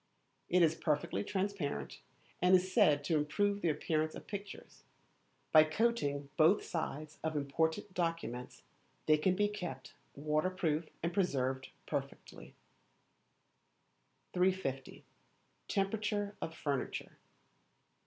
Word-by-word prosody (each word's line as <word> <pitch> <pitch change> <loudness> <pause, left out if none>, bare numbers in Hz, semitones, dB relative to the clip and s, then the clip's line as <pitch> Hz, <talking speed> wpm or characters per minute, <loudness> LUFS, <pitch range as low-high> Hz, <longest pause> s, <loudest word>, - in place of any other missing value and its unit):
It 180 0 +5
is 160 -1 +4
perfectly 150 - -1
transparent, 195 - -2 0.4
and 180 +1 +6
is 185 +1 +1
said 145 -4 +5
to 155 +2 +2
improve 200 +8 +1
the 170 - +2
appearance 155 0 0
of - - -9
pictures. 200 -1 -8 0.7
By 155 - +9
coating 155 -6 0
both 165 +6 +5
sides 155 -2 -4
of 160 -1 -1
important 160 +7 0
documents 165 -9 -3 0.4
they 155 0 +5
can 185 +4 +2
be 205 +2 +3
kept 180 -10 -6 0.2
waterproof 155 +2 0
and 170 +1 0
preserved 130 -8 0 0.2
perfectly. - - -6 1.8
350. 180 -8 -1 0.6
Temperature 205 +1 -1
of 160 - -4
Furniture. 140 -3 -3
165 Hz, 105 wpm, -34 LUFS, 150-190 Hz, 1.8 s, By